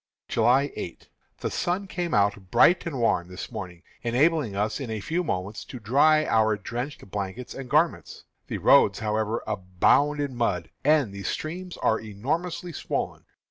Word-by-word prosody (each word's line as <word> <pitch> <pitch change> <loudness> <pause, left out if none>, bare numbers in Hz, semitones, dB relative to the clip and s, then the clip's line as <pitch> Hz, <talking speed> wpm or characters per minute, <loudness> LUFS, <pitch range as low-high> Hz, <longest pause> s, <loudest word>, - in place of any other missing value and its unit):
July 135 +3 +3
8. 85 - -7 0.3
The - - -2
sun 180 +3 -1
came 175 -2 -3
out 100 -2 +1
bright 170 - +5
and 140 -6 -3
warm 100 -7 +2
this 90 +5 -8
morning, 90 -6 -7 0.2
enabling 130 -1 +2
us 105 +2 -1
in 135 -4 -5
a 110 -1 -3
few 165 - -1
moments 100 - -3
to 125 - -8
dry 145 +8 +4
our 110 -1 +3
drenched 120 +7 -5
blankets 100 +4 -4
and 135 -2 -8
garments. 155 +4 +1 0.2
The - - -3
roads, - - +5
however, 110 +1 -1
abound 100 +11 +2
in 140 -3 -2
mud, 95 -8 -1
and 145 -8 +3
the 100 - -7
streams 175 - -4
are 110 - +3
enormously 155 - -3
swollen. - - -3
120 Hz, 160 wpm, -26 LUFS, 100-155 Hz, 0.3 s, bright